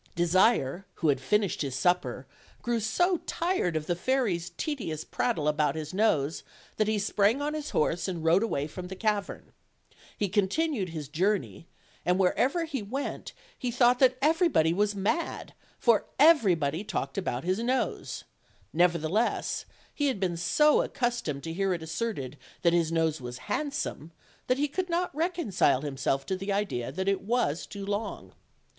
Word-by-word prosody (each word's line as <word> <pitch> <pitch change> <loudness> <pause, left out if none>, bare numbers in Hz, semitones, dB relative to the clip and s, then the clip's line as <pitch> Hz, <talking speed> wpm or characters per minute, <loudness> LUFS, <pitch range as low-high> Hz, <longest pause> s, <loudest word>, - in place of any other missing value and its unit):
Desire, 175 - +2
who 160 - +1
had 135 -2 +2
finished 205 +6 +1
his 135 -4 -2
supper, 135 -6 0 0.4
grew 240 -1 0
so 350 - +2
tired 335 - 0
of 155 -1 -1
the 175 - 0
fairy's 185 -5 0
tedious 210 - -3
prattle 150 -3 -1
about 150 -1 +1
his 155 0 -5
nose 165 -8 +1 0.4
that 215 - +2
he 215 0 +1
sprang 210 +4 +2
on 295 +1 -2
his 305 -1 -4
horse 165 +3 0
and 175 -4 -4
rode 165 +4 +4
away 145 -11 -1
from 180 +4 -7
the 190 - -7
cavern. 210 0 -2 0.7
He 205 - 0
con 200 0 +2
tinued 280 - -1
his 155 -3 -6
journey; 165 - -1 0.4
and 180 +1 +2
wherever 260 - +2
he 280 -6 -4
went 255 +8 -5 0.2
he 250 - -3
thought 245 0 +4
that 255 -1 +4
everybody 310 - +3
was 205 +2 +1
mad, 210 - -2 0.2
for 235 -3 +3
everybody 190 - +4
talked - - -3
about 155 -11 -2
his 185 +4 0
nose; 255 +3 -2 0.5
nevertheless, 175 +5 +1 0.3
he 290 - 0
had 260 -7 -1
been 180 -3 0
so 300 - +4
accustomed 235 - -2
to 165 - -4
hear 195 +1 0
it 165 - -7
asserted 160 - -4 0.2
that 170 -1 +4
his 165 -2 +2
nose 160 -3 +1
was 125 0 -6 0.2
handsome 285 - -3 0.4
that 255 - +2
he 290 +2 +1
could 360 +5 -3
not 345 0 0
reconcile 300 - +1
himself 135 -1 -1
to 190 - -1
the 195 +2 -4
idea 195 - -1
that 190 +7 -3
it 195 -1 +1
was 200 -8 0
too 200 -1 -7
long. 205 +2 -4
195 Hz, 165 wpm, -28 LUFS, 160-245 Hz, 0.7 s, rode